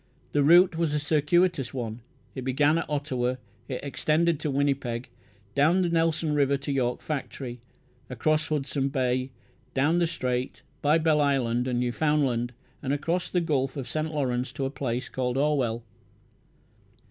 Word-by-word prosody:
The 145 - +2
route 175 +4 +6
was 165 -3 0
a - - +2
circuitous 150 -1 +1
one. 115 -2 -4 0.3
It 130 - -5
began 145 +5 +3
at - - -5
Ottawa; 130 -4 -1 0.3
it 130 - -4
extended 155 +3 +1
to 155 - -2
Winnipeg, 135 -4 -1 0.4
down 160 - +3
the 175 - +1
Nelson 165 -2 +1
River 140 -1 +2
to 140 +1 -4
York 125 -3 0
Factory, 130 -5 -5 0.5
across 155 +5 +1
Hudson 140 -2 -1
Bay, 130 -1 0 0.5
down 150 +6 +3
the 170 - +2
Strait, 125 -5 -3 0.2
by 150 +2 +4
Belle 160 -2 +3
Isle 140 -3 +2
and 120 +2 0
Newfoundland, 125 -1 +1 0.3
and 135 - -2
across 165 +5 -1
the 180 - +1
Gulf 140 -5 0
of 130 -3 -4
St. 155 +6 -2
Lawrence 130 -4 -1
to 135 - -2
a 135 - -2
place 125 -3 -3
called 125 0 -2
Orwell. 135 -6 +1
140 Hz, 155 wpm, -27 LUFS, 125-155 Hz, 0.5 s, route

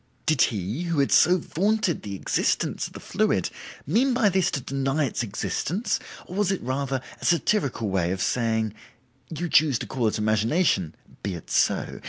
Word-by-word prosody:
Did 155 -5 +2
he, 105 - 0
who 170 -2 -1
had 140 -1 +2
so 180 +3 +6
vaunted 195 +2 0
the 100 -2 -6
existence - - 0
of - - -17
the - - -8
fluid, - - 0 0.3
mean 245 - +2
by 225 -5 +4
this 190 -1 +2
to - - -2
deny 135 +3 -1
its 120 - -2
existence, 150 - -2 0.3
or 180 - -8
was 205 -2 +2
it 195 - -1
rather 135 +1 -2 0.2
a - - -5
satirical 165 - +1
way 95 -3 0
of 95 +1 -2
saying. 110 -3 0 0.6
'You 170 +2 -3
choose 150 -4 +4
to - - -5
call 125 -4 -1
it 110 - 0
imagination; 110 - +1 0.3
be 100 -3 -3
it 85 - -10
so. - - +1
135 Hz, 180 wpm, -25 LUFS, 110-175 Hz, 0.6 s, so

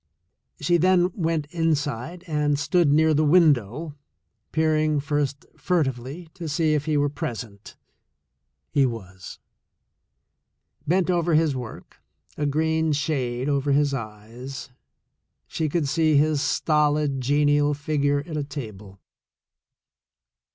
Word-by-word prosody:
She 175 +4 +2
then 180 +1 +3
went 165 -4 -1
inside 160 -1 -2
and 150 -3 0
stood 165 +1 +2
near 155 +1 +4
the 155 +1 +2
window, 150 - +3 0.6
peering 155 -1 +1
first 145 -1 -2
fur 180 -3 +1
tively 135 +6 -6
to 175 -4 -6
see 155 +1 +1
if 150 -1 0
he 155 -2 +1
were 145 0 +2
present. 115 -7 -6 1.0
He 140 - +3
was. 95 -6 -8 1.5
Bent 180 +3 +2
over 170 -2 +1
his 155 -3 +2
work, 125 -3 -9 0.3
a 150 - -1
green 160 +1 +1
shade 135 -4 -1
over 140 -1 +1
his 145 0 +2
eyes, 120 +3 -7 0.7
she 155 -1 -2
could 155 -1 0
see 155 0 +2
his 150 0 +2
stolid, 150 -3 +1
genial 145 +2 +2
figure 145 -1 0
at 165 -2 -7
a 150 - -1
table. 105 -9 -9
145 Hz, 120 wpm, -24 LUFS, 135-160 Hz, 1.5 s, near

